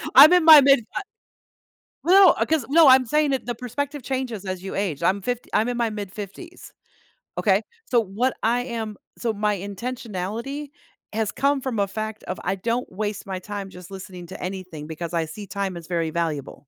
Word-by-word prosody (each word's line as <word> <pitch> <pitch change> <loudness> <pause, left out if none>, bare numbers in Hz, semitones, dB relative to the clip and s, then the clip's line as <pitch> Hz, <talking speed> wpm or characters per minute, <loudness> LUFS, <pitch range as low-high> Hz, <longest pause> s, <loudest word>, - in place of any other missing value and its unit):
I'm 300 +6 +10
in 355 -3 +4
my 310 -2 +11
mid, 275 -4 +5
uh - - -1 1.0
No, 380 +1 +8
uh, - - 0
'cause 310 -7 0
No, 320 +1 +6
I'm 260 0 +7
saying 300 +3 +2
it 260 - -2
the 240 - -3
perspective 280 +3 -4
changes 250 -7 -3
as 185 -1 -4
you 190 - -5
age, 185 -8 -2
I'm 195 +1 +2
50 245 +3 -3
I'm 220 +3 +2
in 245 - -2
my 235 -2 +1
mid-fifties, 210 - -8 0.7
okay? - - +3 0.3
So, 240 - +4
what 225 +5 -1
I 240 +2 +2
am 225 -4 -5 0.2
So 230 -2 -1
my 210 0 0
intentionality 230 +6 -5 0.4
has 220 -1 0
come 275 +2 +1
from 250 -5 -3
a 200 - +2
fact 215 +2 -5
of 185 - -5
I 195 +2 0
don't 230 +5 -2
waste 205 +1 -4
my 190 -1 -4
time 200 0 -6
just 180 0 -12
listening 185 -2 -9
to - - -10
anything 180 -5 -6
because 165 +2 -6
I 165 -1 +1
see 200 +6 -8
time 195 -1 -3
as 170 - -9
very 165 -2 -1
valuable. 155 -4 -2
215 Hz, 195 wpm, -23 LUFS, 190-255 Hz, 1.0 s, my